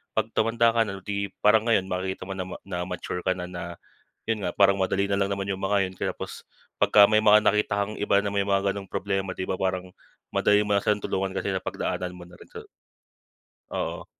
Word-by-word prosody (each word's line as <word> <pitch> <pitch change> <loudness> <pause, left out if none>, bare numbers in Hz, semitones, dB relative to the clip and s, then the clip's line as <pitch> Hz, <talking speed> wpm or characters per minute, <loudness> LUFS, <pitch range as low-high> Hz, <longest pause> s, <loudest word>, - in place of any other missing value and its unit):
'pag 110 +1 0
tumanda 115 +1 +3
ka 115 -1 +2
na 95 -2 -7
'di, 100 -1 -2 0.2
parang 110 +2 +5
ngayon, 110 -5 +3
makikita 95 +1 -3
mo 95 - -7
na 95 -1 -4 0.2
na 90 -2 -4
mature 90 0 -4
ka 95 - +1
na 90 - -5
na, 90 -1 -6 0.7
yun 110 -3 -1
nga, 90 - -1
parang 100 0 +4
madali 95 +1 0
na 100 - +1
lang 100 0 0
naman 100 0 -3
yung 95 - -2
mga 100 -1 +2
yun 95 - -12
kaya - - -2
pos - - -8 0.3
pagka 100 -1 +6
may 110 - +5
mga 105 0 +7
nakita 105 0 +2
kang 105 +1 -3
iba 100 -1 +3
na 100 - -2
may 100 0 0
mga 100 0 +1
gano'ng 100 0 -6
problema, 95 -1 -2
di 95 - -5
ba, 95 - -1
parang 95 -1 -2 0.4
madali 105 0 +3
mo 105 -1 +1
na 100 - 0
siyang 105 -1 +2
tulungan 95 -1 -2
kasi - - -3
sa - - -3
pagdaanan 90 0 -3
mo 90 -1 -11
na 90 - -15
rin - - -16
sa - - -7 1.1
oo. - - -3
100 Hz, 230 wpm, -26 LUFS, 95-105 Hz, 1.1 s, mga